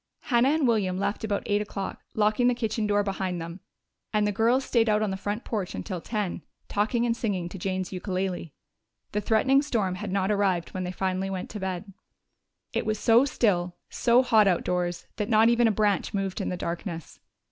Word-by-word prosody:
Hannah 245 +1 +3
and 300 -2 +2
William 200 -6 +1
left 200 +2 -2
about 205 -2 -1
eight 205 0 +1
o'clock, 200 -2 -5
locking 215 +3 +3
the 250 - +3
kitchen 220 -2 -1
door 205 0 +2
behind 190 -3 -2
them, 170 +2 -7 0.5
and 210 -1 +2
the 210 - +1
girls 235 +6 +2
stayed 230 -2 +2
out 210 0 +3
on 210 - 0
the - - -2
front 205 +4 -3
porch 205 -5 -3
until 165 - -4
ten, 210 -4 -3 0.3
talking 220 +4 +1
and 230 -1 +1
singing 200 -7 -2
to 190 - -8
Jane's 185 0 -2
ukulele. 185 -2 -3 0.6
The 210 - -1
threatening 245 +6 +3
storm 220 -10 0
had 200 +1 -5
not 195 +1 +1
arrived 195 -5 +1
when 185 -1 -4
they 180 - -3
finally 190 +1 -1
went 190 -1 -4
to 210 - -6
bed. 190 +1 -4 0.8
It - - -1
was 215 0 +1
so 230 +4 +5
still, 180 -9 +1 0.2
so 245 +1 +4
hot 220 -5 +5
outdoors 180 -1 0
that 210 - -2
not 220 0 +5
even 235 0 +4
a - - +3
branch 210 -1 +1
moved 195 -1 -2
in - - -2
the 180 - -3
darkness. 170 -1 -5
205 Hz, 200 wpm, -27 LUFS, 185-225 Hz, 0.8 s, so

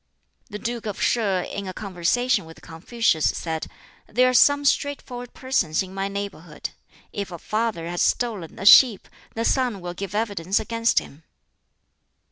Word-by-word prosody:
The 210 - -6
Duke 235 0 -4
of 205 - -5
Sheh 200 -6 +1
in 200 +1 -6
a 185 - -5
conversation 200 +3 0
with 160 0 -14
Confucius 165 0 0
said, 160 -1 -4 0.4
"There 250 +3 +3
are - - 0
some 285 +4 +5
straightforward 250 -3 -1
persons 200 -11 0
in 190 0 -11
my 195 0 -2
neighborhood. 195 -5 -6 0.4
If 200 -2 -4
a 175 - -6
father 215 -2 -2
has 175 0 -2
stolen 215 -9 -1
a 195 - -6
sheep, 220 -1 +7 0.3
the 230 +1 -1
son 250 -6 +1
will 175 -1 -6
give 195 +2 -6
evidence 200 -4 0
against 230 +1 0
him." 145 - -1
205 Hz, 155 wpm, -23 LUFS, 180-235 Hz, 0.4 s, sheep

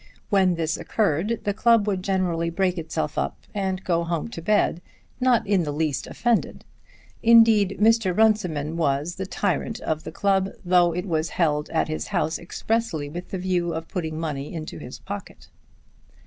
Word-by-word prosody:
When 190 -3 +4
this 165 0 -1
occurred 210 +2 0
the 205 - 0
club 230 0 +4
would 195 -3 -1
generally 180 -3 0
break 180 +1 0
itself 160 -2 -3
up - - -2 0.2
and 190 -2 -2
go 170 -2 +1
home 170 +4 -2
to 165 - -7
bed, 190 -2 +2 0.4
not 250 -2 +3
in 200 -2 +2
the 150 -3 -2
least 150 -2 -1
offended. 240 -2 -1 0.6
Indeed 225 -4 +5
Mr. 220 -4 +3
Runciman 175 -9 +2
was 150 +2 0
the 190 0 -4
tyrant 205 +3 -1
of 155 -1 -2
the - - -7
club, 195 +2 +1 0.2
though 175 -1 +4
it 180 +2 -3
was 160 -3 -1
held 150 -4 +1
at 160 - 0
his 155 0 -4
house 170 -5 -1
expressly 170 -4 -2
with 175 +4 -7
the 190 - -3
view 180 -2 -1
of 165 0 -6
putting 160 -4 -3
money 150 -3 -4
into 160 -2 -6
his 125 - -8
pocket. 200 0 -9
180 Hz, 170 wpm, -24 LUFS, 160-200 Hz, 0.6 s, Indeed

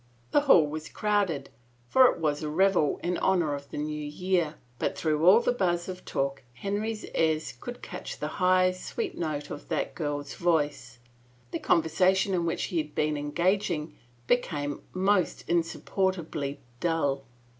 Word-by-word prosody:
The 290 - +5
hall 225 - +6
was 155 +1 -5
crowded, 205 -8 +1
87 - - -17
THE - - -17
FAVOR 120 +1 -33
OF 120 - -35
KINGS 120 0 -32
for 260 -1 +8
it - - -7
was 150 -1 0
a 155 - -2
revel 180 -2 +2
in 175 0 0
honor 175 -6 +2
of 140 0 -6
the - - -7
New 150 0 -3
Year, 170 +1 0 0.2
but - - -1
through 155 -1 0
all 210 +6 +8
the 240 - +2
buzz 175 -7 0
of 185 -1 -7
talk 135 0 -2
Henry's 210 - -3
ears 160 -1 +1
could 245 0 -7
catch - - -6
the - - -3
high, 185 0 +5
sweet 185 - -4
note 150 -3 -3
of 145 - -8
that - - -1
girl's 145 -3 -3
voice. 145 -7 0 0.5
The - - -2
conversation 185 +4 +3
in 170 -2 +1
which 165 - -1
he 175 -4 -1
had 150 -1 -5
been 150 0 +1
engaging 165 +1 0 0.3
be 245 - +5
came 145 - -4
most 185 -1 +1
insupportably 165 -4 -1 0.2
dull. 145 -5 0
165 Hz, 175 wpm, -28 LUFS, 150-185 Hz, 0.5 s, for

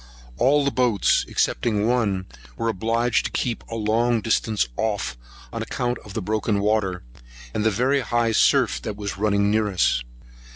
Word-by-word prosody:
All 140 +3 +3
the 140 - +1
boats, 120 -7 +2
excepting 105 -3 0
one, 105 -6 +1 0.3
were 115 - -1
obliged 115 +3 0
to - - -3
keep 120 -2 -2
a 115 - -5
long 115 +2 +1
distance 110 - 0
off 105 - -2 0.4
on - - -3
account 120 -1 -2
of 105 0 -12
the 110 - -2
broken 110 +1 0
water, 100 -3 0 0.5
and 105 - -1
the 110 - +4
very 125 +7 +1
high 120 -3 0
surf 60 - +3
that 105 - -5
was 100 -2 -5
running 100 -1 +2
near 110 0 +2
us. 90 -10 +1
110 Hz, 165 wpm, -23 LUFS, 100-120 Hz, 0.5 s, the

